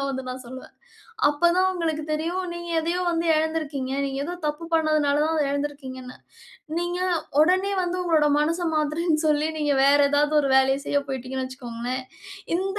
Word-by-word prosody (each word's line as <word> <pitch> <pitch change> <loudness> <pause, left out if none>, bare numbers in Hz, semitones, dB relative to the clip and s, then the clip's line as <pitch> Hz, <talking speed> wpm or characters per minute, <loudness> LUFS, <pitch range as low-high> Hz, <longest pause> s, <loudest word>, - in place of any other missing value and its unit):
தான் 275 - -1
வந்து 265 -1 -4
நான் 255 +1 -6
சொல்லுவேன். 260 +1 -10 0.6
அப்ப 340 +4 +2
தான் 375 0 +4
உங்களுக்கு 320 -3 -2
தெரியும், 335 +4 -2
நீங்க 345 0 -7
எதையோ 345 +3 -1
வந்து 335 0 -1
எழந்திருக்கீங்க, 310 -4 -2
நீங்க 270 0 -4
ஏதோ 350 - -4
தப்பு 300 +3 -4
பண்ணதுனால 305 -2 +2
தான் 320 +1 0
அதை 295 - +2
எழந்துருக்கீங்கன்னு. 270 -3 -5 0.6
நீங்க 350 +1 -2 0.4
ஒடனே 375 +4 +2
வந்து, 355 +1 -2
உங்களோட 320 -4 +3
மனச 330 +4 0 0.2
மாத்துறேன்னு, 310 +1 +1
சொல்லி 300 +1 +2
நீங்க 295 -2 +1
வேற 285 +1 +5
ஏதாவது 295 +1 +2
ஒரு 275 - 0
வேலைய 265 0 +4
செய்ய 285 - +1
போய்ட்டீங்கன்னு 260 0 -4
வச்சுக்கோங்களேன், 255 0 -5 0.5
இந்த 390 +2 -2
300 Hz, 165 wpm, -24 LUFS, 270-335 Hz, 0.6 s, வேற